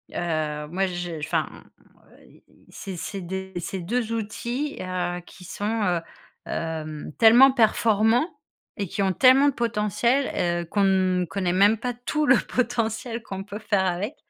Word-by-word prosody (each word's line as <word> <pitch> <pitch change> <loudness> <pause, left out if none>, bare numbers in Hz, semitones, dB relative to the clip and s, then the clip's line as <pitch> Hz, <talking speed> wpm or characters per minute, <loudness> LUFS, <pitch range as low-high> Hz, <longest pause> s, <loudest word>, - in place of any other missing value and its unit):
heu, 155 -3 -2
moi, 190 +4 0
je, 175 -2 -5
enfin, 150 - -1
m - - -15 0.5
et - - -20
et - - -26
c'est 195 -2 -7
c'est 195 +3 -5
des 190 +2 -5
c'est 190 +2 -5
2 230 +6 -2
outils, 235 +6 -3
heu, 180 -1 -3
qui 185 - -15
sont, 210 +4 -2
heu, 175 -3 +1 0.5
hem, 155 -2 -4
tellement 240 +4 +8
performants 225 - +3 0.5
et 200 -2 -2
qui 200 - -3
ont 190 - +2
tellement 260 +7 +6
de - - -3
potentiel, 230 -4 0
heu, - - -10
qu'on 200 +4 0
ne 185 -1 +2
connaît 180 +1 -2
même 200 +4 +4
pas 245 +2 -3
tout 275 +6 -2
le 270 -3 +6
potentiel 235 -1 -2
qu'on 195 -3 -6
peut 205 +1 -8
faire 205 -3 +1
avec 190 - -2
200 Hz, 165 wpm, -24 LUFS, 180-235 Hz, 0.5 s, tellement